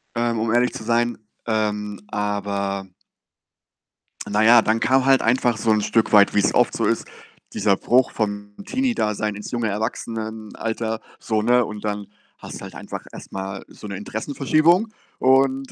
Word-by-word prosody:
ähm, 115 -1 0
um 115 +1 0
ehrlich 125 +1 +2
zu 110 - -7
sein. 120 +1 +1 0.3
Ähm, 105 -2 -1
aber 100 -2 -2 1.4
na 105 +1 +1
ja, 115 +1 +8
dann 110 +1 +1
kam 130 +2 +3
halt 135 -1 +5
einfach 120 0 +2
so 110 0 +1
'n 105 -1 +3
Stück 115 +1 +1
weit, 100 -1 +6
wie's 100 - +3
oft - - +3
so - - 0
ist, - - 0 0.5
dieser 100 - +2
Bruch 125 +5 +2
vom 105 -1 -3
Teenie-Dasein 110 - -1
ins 105 - -7
junge 120 -3 -1
Erwachsenenalter 110 +1 -4 0.2
so, 110 -1 -1
ne, 120 +1 +3
und 105 -1 -8
dann 105 -1 -3 0.3
hast - - -9
du - - -13
halt - - -9
einfach - - -7
erst - - -11
mal 95 0 -5
so 105 - -11
'ne 100 - -5
Interessenverschiebung 155 - +1 0.3
und, 135 +1 +3
110 Hz, 160 wpm, -22 LUFS, 105-120 Hz, 1.4 s, ja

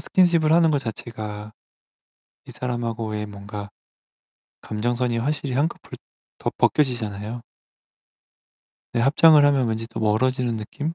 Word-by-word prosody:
스킨십을 170 -4 +3
하는 165 -1 +5
것 145 - +2
자체가 110 -3 -6 0.9
이 - - -10
사람하고의 115 -3 -3
뭔가 100 0 -8 0.9
감정선이 120 +2 -1
확실히 140 +2 -2
한꺼풀 145 +6 -2 0.4
더 - - -2
벗겨지잖아요. 115 -5 0 1.5
네. 120 - +1
합장을 150 +4 +6
하면 140 -3 +3
왠지 110 0 -2
또 - - -6
멀어지는 120 +2 +1
느낌? 145 +9 -5
120 Hz, 275 characters per minute, -23 LUFS, 110-145 Hz, 1.5 s, 합장을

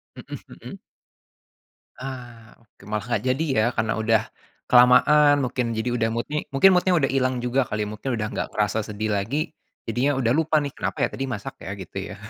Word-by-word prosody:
Mhm - - -8
mhm. - - -11 1.2
Ah, 120 -4 -9
oke, 115 -3 -25
malah 105 +1 -2
nggak 120 -4 -1
jadi, 155 +5 -2
ya? 110 -1 +2
Karena 110 0 +1
udah 110 -1 +3 0.4
kelamaan 140 +4 +6
mungkin, 120 -2 -2
jadi 120 +2 -1
udah, 115 -2 0
mood-nya 130 +7 -2
mungkin 185 +8 +5
mood-nya 180 0 +3
udah 135 -4 +1
ilang 130 -1 +1
juga 125 +2 0
kali, 105 0 -2
mungkin 110 +4 -4
udah 105 -1 -2
nggak - - -2
kerasa 105 +1 0
sedih 105 0 -3
lagi, 145 - -2 0.3
jadinya 130 +5 0
udah 120 -3 +1
lupa 155 +1 +2
nih, 145 -2 -2
"Kenapa - - -1
ya? - - -4
Tadi 135 - -3
masak 105 -5 -5
ya?" 95 - -6
Gitu 95 0 -9
ya? 100 - -7
120 Hz, 185 wpm, -24 LUFS, 110-135 Hz, 1.2 s, kelamaan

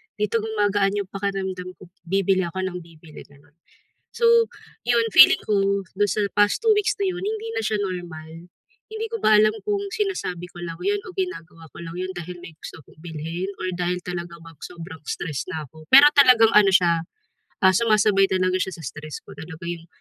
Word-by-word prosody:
"Dito 210 +2 0
gumagaan 205 -2 0
'yong 195 -2 -3
pakiramdam 190 -2 -4
ko, 175 - -15 0.2
bibili 190 0 +1
ako 185 +3 -4
nang 185 -1 -3
bibili," 160 -2 -14
gano'n. 145 +1 -23 0.6
So, 470 - +1 0.6
'yon, 235 -1 +3
feeling - - +8
ko, 200 -1 +1 0.2
do'n 205 - +3
sa 210 - 0
past 205 - +3
2 450 - +2
weeks 415 - +1
na 385 - +1
'yon 355 0 -5
hindi 440 +1 -4
na - - 0
siya 215 - 0
normal, 175 -4 -6 0.6
hindi 440 +1 -3
ko 455 - -2
ba 215 0 +5
alam 215 0 +3
kung 410 -1 -1
sinasabi 380 - -3
ko 175 - -10
lang 165 -1 -6
'yon 410 0 +1
o - - -10
ginagawa 165 - -5
ko - - -13
lang 165 +1 -8
'yon 185 0 -3
dahil 175 +1 -7
may 165 - -11
gusto - - -10
akong - - -21
bilhin, 165 +3 -5
or 185 - -2
dahil 180 0 -1
talaga 170 -1 -6
bang 165 -3 -15
sobrang 165 -3 -9
stress 150 -6 -4
na 155 -3 -5
ako. 155 +3 -17
Pero 280 +2 +9
talagang 250 -5 +6
ano 205 -2 +7
siya, 170 -3 +3 0.6
ah, 190 - +7
sumasabay 210 -3 +3
talaga 185 0 +1
siya 190 - -3
sa - - -10
stress 155 +2 -8
ko, - - -13
talaga 160 +1 -10
yung, 170 -1 -6
185 Hz, 195 wpm, -23 LUFS, 170-215 Hz, 0.6 s, Pero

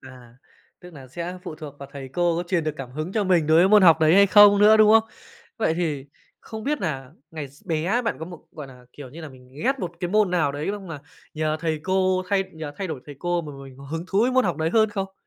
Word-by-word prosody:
À, 125 -2 -15 0.4
tức 180 -1 -13
nà 135 -4 -12
sẽ 175 +6 -6
phụ 175 -4 -7
thuộc 155 -3 -10
vào 140 - -10
thầy 135 -2 -8
cô 170 +4 0
có 175 - -1
truyền 175 -2 -1
được 155 -1 -2
cảm 135 -3 -8
hứng 155 +6 -5
cho 215 -1 0
mình 175 -5 +2
đối 160 +1 +4
với 180 +3 +5
môn 210 0 +6
học 165 -3 +6
đấy 160 +1 +4
hay 200 +1 +6
không 205 0 +7
nữa, 210 +1 +6
đúng 215 -1 +5
không? 225 0 +4 0.5
Vậy 215 -7 +1
thì 155 -6 -3 0.3
không 220 -1 -9
biết 295 +1 -1
nà 135 -8 -4 0.2
ngày 155 -3 -7
x 140 +6 -22
bé 175 +8 0
bạn 230 - -2
có 160 - -6
một, 175 -1 -12
gọi 150 -3 -9
nà, 125 -2 -16
kiểu 140 -3 -11
như 160 +6 -11
là, 160 - -8
mình 130 -2 -17 0.2
ghét 270 +2 +1
một 175 -7 -5
cái 175 -2 -3
môn 210 -1 +2
nào 160 -6 +1
đấy 145 +2 -4
xong 200 -2 -7
là 150 -3 -7 0.3
nhờ 155 0 -1
thầy 160 -2 -2
cô 185 0 +1
thay 195 -1 +1
nhờ 160 -2 -7
thay 195 - -4
đổi 155 -7 -6
thầy 145 -2 -10
cô 175 +1 -1
mà 150 -2 -8
mình 130 -1 -13
có 140 - -12
hứng 165 +4 -5
thú 195 - +1
với 250 - +2
môn 255 -2 +3
học 175 -5 -1
đấy 160 +1 -1
hơn 220 +2 +3
không? 195 -2 -4
170 Hz, 280 wpm, -23 LUFS, 150-195 Hz, 0.5 s, không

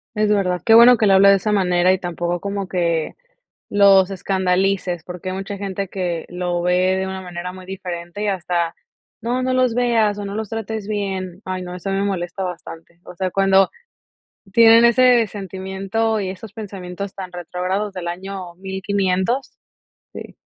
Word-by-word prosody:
Es 215 0 +1
verdad, 185 -4 +1
qué 225 - +5
bueno 240 +2 +9
que 215 - +2
le 195 - +5
hable 195 +1 +7
de 200 - +6
esa 210 +3 -2
manera 180 -2 +3
y 190 - +2
tampoco 175 -1 -3
como 200 +1 -4
que 170 -3 -1 0.5
los 195 -2 +5
escandalices, 190 -2 0
porque, 180 +1 -7
hay - - -4
mucha 195 +1 -5
gente 195 0 -4
que 175 -3 -3
lo 175 -1 -2
ve 180 +1 +2
de 190 0 -2
una 190 0 -5
manera 180 0 -6
muy 185 0 -11
diferente 180 0 -6
y - - 0
hasta: 175 -3 -1 0.5
"No, 245 +3 -1
no 255 0 0
los 255 -2 +2
veas 225 -4 +2
o 205 - -4
no 200 +1 -5
los 220 -2 -4
trates 220 -2 -5
bien", 190 -3 -4
ay 185 0 -4
no, 180 0 -7
eso 180 +2 -5
me 195 0 0
molesta 190 -1 -3
bastante, 170 -1 -8
o - - -11
sea, 185 0 -2
cuando 195 0 +4 0.8
tienen 230 +1 +7
ese 240 -1 +5
sentimiento 195 +3 -3
y 195 -2 -2
esos 190 +2 -9
pensamientos 200 -2 -7
tan 190 -2 -7
retrógrados 180 +4 -3
del 180 -2 -5
año 185 -1 -6
1500. 190 +5 -1 0.6
Sí. - - -9
190 Hz, 175 wpm, -20 LUFS, 180-205 Hz, 0.8 s, bueno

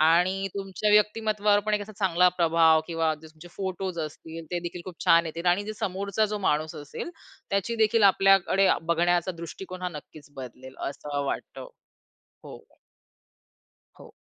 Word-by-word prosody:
आणि 180 +5 +3
तुमच्या 195 +1 -2
व्यक्तिमत्त्वावर 210 0 +3
पण 215 - +1
एक 205 - -1
असा 215 +1 -10
चांगला 180 -2 +4
प्रभाव 165 -2 +4
किंवा 165 -2 0
तुमचे 160 +2 -14
फोटोस 190 -2 -4
असतील 160 +2 -10
ते 175 - -1
देखील 175 0 -6
खूप 180 -3 -8
छान 165 0 +5
येतील 165 +2 -6
आणि 200 +4 +1
समोरचा 200 +1 -1
जो 210 0 -3
माणूस 155 +1 0
असेल 145 - -7 0.4
त्याची 200 +4 -1
देखील 220 0 +3
आपल्याकडे 195 0 +4
बघण्याचा 175 +2 +1
दृष्टिकोन 180 +2 -8
हा 180 - -1
नक्कीच 150 -2 -12
बदलेल. 130 0 -9
असं 145 0 -4
वाटतं. - - -5 0.8
हो. - - -13 1.2
हो. - - -14
180 Hz, 145 wpm, -26 LUFS, 165-200 Hz, 1.2 s, छान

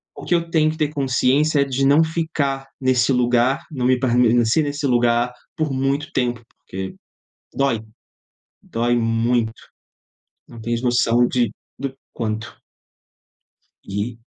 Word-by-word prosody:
O - - -10
que - - 0
eu 170 -1 -1
tenho 155 -1 +3
que 160 - -8
ter 155 -2 +1
consciência 140 +2 +2
é - - +5
de 135 0 0
não 145 +4 +5
ficar 155 -4 -2
nesse 130 -1 +3
lugar, 125 +1 +2
não 130 -5 -2
me 130 0 +4
permanecer 120 +1 +3
nesse 145 0 -3
lugar 120 0 +2 0.3
por 155 -3 0
muito 135 +3 -1
tempo, 120 -2 0 0.2
porque 95 0 -7 0.6
dói, 135 -5 +1 0.8
dói 120 +1 0
muito. 115 0 +1 1.0
Não 115 - -12
tens 115 +1 -2
noção 120 -1 +3
de 120 -1 +1 0.3
do 135 0 -3 0.2
quanto. 110 -1 -4 1.3
E 110 +4 -4
125 Hz, 135 wpm, -21 LUFS, 120-140 Hz, 1.3 s, é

